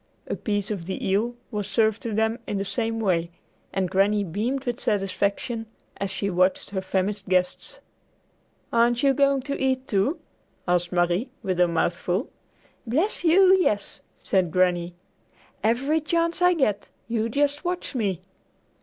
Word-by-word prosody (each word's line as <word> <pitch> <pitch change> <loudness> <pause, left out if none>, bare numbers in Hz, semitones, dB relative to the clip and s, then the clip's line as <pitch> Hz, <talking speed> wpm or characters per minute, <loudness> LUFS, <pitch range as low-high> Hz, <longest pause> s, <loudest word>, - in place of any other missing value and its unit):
A - - -3
piece 205 -1 -2
of 180 -5 -4
the 190 - -3
eel 215 +5 +1 0.2
was 205 -3 -3
served 220 +1 +1
to 230 - -4
them 220 +2 0
in 205 - -2
the 195 - -2
same 225 +3 -2
way, 175 -6 +1 0.4
and 190 -1 0
Granny 200 +3 +2
beamed 225 - -2
with 245 -1 -2
satisfaction 205 +3 -1 0.3
as 200 - -2
she 195 +1 -2
watched 185 +1 +1
her 190 -2 -2
famished 195 +1 -2
guests. 180 -1 0 0.9
"Aren't 235 +2 +3
you 275 -1 +5
going 275 -1 +2
to 280 0 -4
eat, 265 0 0
too?" 205 - +1 0.5
asked 175 0 +1
Marie 175 +7 +1
with 185 -2 -1
her 180 - +5
mouth 170 0 +1
full. 185 - -2 0.6
"Bless 320 - 0
you, 370 +3 +6
yes," 205 - -1
said 185 -3 0
Granny. 175 0 +1 0.7
"Every 270 +8 +2
chance 335 +3 +1
I 360 0 +5
get. 210 - 0 0.2
You 230 -1 -1
just 285 +4 0
watch 355 -2 -3
me!" 200 - -1
210 Hz, 155 wpm, -25 LUFS, 190-260 Hz, 0.9 s, you